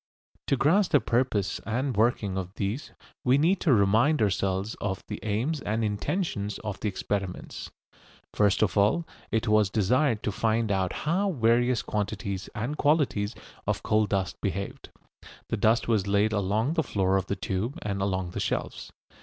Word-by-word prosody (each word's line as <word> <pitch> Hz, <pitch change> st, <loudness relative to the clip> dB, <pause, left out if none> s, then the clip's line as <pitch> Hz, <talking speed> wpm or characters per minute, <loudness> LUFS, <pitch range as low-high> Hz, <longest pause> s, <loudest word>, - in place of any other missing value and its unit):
To 140 Hz, -, +2 dB
grasp 175 Hz, +9 st, +3 dB
the 145 Hz, -, +7 dB
purpose 115 Hz, -4 st, 0 dB
and 125 Hz, +5 st, -1 dB
working 105 Hz, -3 st, +1 dB
of 95 Hz, 0 st, -4 dB
these 105 Hz, +8 st, -3 dB, 0.3 s
we 130 Hz, +2 st, +4 dB
need 175 Hz, +6 st, +3 dB
to 160 Hz, -, +3 dB
remind 115 Hz, +8 st, +4 dB
ourselves 100 Hz, 0 st, 0 dB
of 95 Hz, -1 st, -2 dB
the -, -, -5 dB
aims 120 Hz, +9 st, -1 dB
and 110 Hz, +2 st, -1 dB
intentions 105 Hz, -, -2 dB
of 105 Hz, -2 st, -4 dB
the -, -, -2 dB
experiments. 95 Hz, -1 st, -4 dB, 0.6 s
First 105 Hz, 0 st, +3 dB
of 95 Hz, -5 st, 0 dB
all 105 Hz, +12 st, +3 dB, 0.2 s
it 115 Hz, +1 st, 0 dB
was 105 Hz, -2 st, +4 dB
desired 115 Hz, +4 st, +2 dB
to 105 Hz, -, 0 dB
find 110 Hz, +1 st, 0 dB
out 95 Hz, -2 st, +1 dB
how 190 Hz, +6 st, +1 dB
various 120 Hz, -, +2 dB
quantities 100 Hz, -1 st, -3 dB
and 120 Hz, +8 st, -3 dB
qualities 135 Hz, -9 st, +1 dB, 0.3 s
of -, -, -1 dB
coal 110 Hz, 0 st, +2 dB
dust 95 Hz, -2 st, -2 dB
behaved. 100 Hz, +3 st, -4 dB, 0.6 s
The -, -, -1 dB
dust 115 Hz, +2 st, +2 dB
was 105 Hz, -4 st, +1 dB
laid 100 Hz, +2 st, +2 dB
along 105 Hz, +7 st, +1 dB
the 165 Hz, -, +2 dB
floor 95 Hz, -9 st, 0 dB
of 95 Hz, -1 st, 0 dB
the 100 Hz, -, -1 dB
tube 105 Hz, +7 st, -3 dB
and 100 Hz, -2 st, -2 dB
along 95 Hz, -2 st, -1 dB
the -, -, -4 dB
shelves. -, -, -3 dB
105 Hz, 165 wpm, -27 LUFS, 100-125 Hz, 0.6 s, the